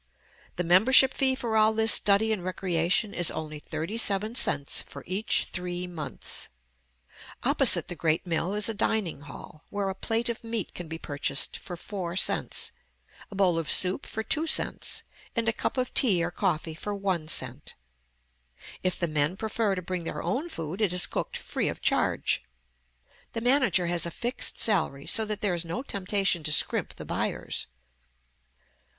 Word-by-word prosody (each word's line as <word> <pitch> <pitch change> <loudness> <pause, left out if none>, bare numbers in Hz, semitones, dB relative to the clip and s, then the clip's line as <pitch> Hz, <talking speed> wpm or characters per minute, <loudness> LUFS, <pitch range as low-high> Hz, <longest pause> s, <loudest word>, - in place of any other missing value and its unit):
The 180 - -1
membership 235 +10 +6
fee 265 -1 +3
for 235 -4 -3
all 220 0 +4
this 220 0 +5
study 210 +2 +4
and 195 -5 -4
recreation 185 +2 -1
is 175 - +2
only 155 -1 -6
thirty 160 +8 -5
seven 210 +1 +1
cents 145 - +1
for - - -11
each 195 +5 +1
three 180 0 -5
months. 170 -4 -4 0.9
Opposite - - +5
the - - -5
great 160 +1 0
mill 175 +3 -1
is 210 0 +1
a 225 - -1
dining 205 -6 -1
hall, 145 +2 -12
where 200 -1 -2
a - - -3
plate 225 +5 -2
of 235 -1 -4
meat 230 -3 -4
can 175 - -7
be 160 +1 -6
purchased 145 -2 -2
for 180 - -8
four 175 -1 -5
cents, 190 - 0 0.6
a 205 - -10
bowl 185 -4 +2
of 160 - -4
soup 185 0 +3
for 220 - -4
two 310 +8 +1
cents, - - 0 0.3
and 230 -1 0
a 225 - +3
cup 265 - -3
of 255 -1 -2
tea 190 -10 +3
or 175 - -2
coffee 170 -4 -2
for 205 +5 -5
one 190 -5 -2
cent. 130 -3 -1 1.1
If 185 -1 0
the 170 - 0
men 155 +3 0
prefer 220 -2 -1
to 185 - -5
bring 180 0 -4
their - - -5
own 295 +7 -2
food, 165 - -5
it 195 -4 +2
is 180 - +4
cooked - - -4
free - - -2
of - - -4
charge. - - +1 0.9
The 230 - -3
manager 250 -7 +3
has 170 -1 0
a - - -3
fixed 240 +8 -2
salary, 160 -10 +1
so 220 - +3
that 210 -1 -4
there 205 -3 +1
is 170 -1 -1
no 170 +10 -5
temptation 195 - 0
to 155 - +2
scrimp 150 - +2
the - - -9
buyers. - - -3
190 Hz, 175 wpm, -27 LUFS, 170-220 Hz, 1.1 s, membership